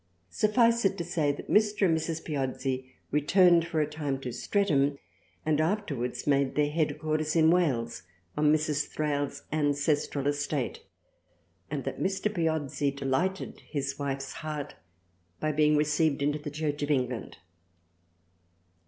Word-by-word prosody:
Suffice 230 +2 +3
it 195 - +2
to 170 - -2
say, 150 -4 0
that 145 - -8
Mr. 210 -1 +3
and 165 -3 +3
Mrs. 160 0 -3
Piozzi 130 -3 -2 0.2
returned 170 +3 +4
for 160 -2 0
a - - +2
time 150 -3 -3
to 125 - -4
Streatham 145 - +1 0.5
and 155 -1 +2
afterwards 145 - -2
made 140 -2 +2
their 150 0 +2
headquarters 155 0 -1
in 160 0 +5
Wales 125 -10 +1 0.3
on 150 0 +3
Mrs. 150 -1 +1
Thrale's 145 -2 -2
ancestral 145 -1 0
estate, 145 -2 -1 0.9
and 140 -2 -3
that - - -4
Mr. 195 +2 0
Piozzi 160 -5 0
delighted 140 +7 -2
his 140 -2 -4
wife's 135 -1 -3
heart 150 -2 -5 0.7
by 155 - 0
being 150 0 +3
received 150 -1 +2
into 150 +1 +1
the 150 0 -6
Church 150 0 -3
of 145 - -1
England. 125 -4 -1
150 Hz, 135 wpm, -29 LUFS, 140-160 Hz, 0.9 s, in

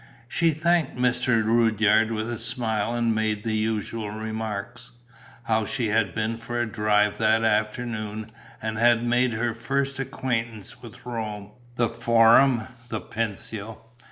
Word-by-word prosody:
She 165 +6 +2
thanked 160 -2 +1
Mr. 125 -2 +2
Rudyard 110 -1 +3
with 110 0 -2
a 120 -1 -4
smile 110 -1 -1
and 115 -1 +1
made 110 -1 -1
the 110 -1 -1
usual 110 0 -2
remarks: 110 +2 -5 0.5
how 110 -2 0
she 120 -5 -1
had 105 -5 +1
been 110 +1 -1
for 120 +1 -4
a 120 - +1
drive 105 -2 +1
that 110 0 +3
afternoon 110 0 -1 0.3
and 110 -1 -2
had 120 0 +4
made 120 0 +2
her 115 +1 -1
first 135 +4 -2
acquaintance 120 -5 -3
with - - -13
Rome, 105 -4 -5 0.2
the 120 -1 +2
Forum, 115 +1 +4 0.2
the 110 - -2
Pincio. 110 0 -4
115 Hz, 140 wpm, -25 LUFS, 110-120 Hz, 0.5 s, had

